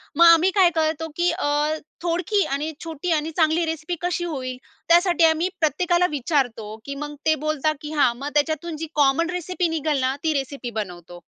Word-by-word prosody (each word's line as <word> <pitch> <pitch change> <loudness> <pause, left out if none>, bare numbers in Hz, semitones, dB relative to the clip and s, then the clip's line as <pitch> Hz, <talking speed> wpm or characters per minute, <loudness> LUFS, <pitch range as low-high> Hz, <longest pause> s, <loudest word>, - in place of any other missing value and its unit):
मग 340 - +6
आम्ही 335 +2 +7
काय 375 -2 +5
करतो, 320 0 0
की 350 +1 +2
अ, 335 - -3 0.6
थोडकी 355 +4 +1
आणि 295 +3 -2
छोटी 330 +1 -4
आणि 315 0 0
चांगली 320 +1 +3
रेसिपी 320 +2 -3
कशी 355 0 -1
होईल, 260 -6 -4 0.3
त्यासाठी 345 0 +4
आम्ही 320 +3 +2
प्रत्येकाला 345 +3 +2
विचारतो, 245 -7 -1
की 280 - -5
मग 295 +1 -6
ते 315 - +4
बोलता, 310 0 +1
की 300 - -7
हां. 280 -5 +3
मग 280 +3 -4
त्याच्यातून 315 +3 0
जी 325 +1 -5
कॉमन 295 +4 +3
रेसिपी 360 0 -2
निघलना 295 -5 0
ती 320 -1 +1
रेसिपी 275 -2 -3
बनवतो. 175 -2 -10
315 Hz, 175 wpm, -23 LUFS, 285-340 Hz, 0.6 s, आम्ही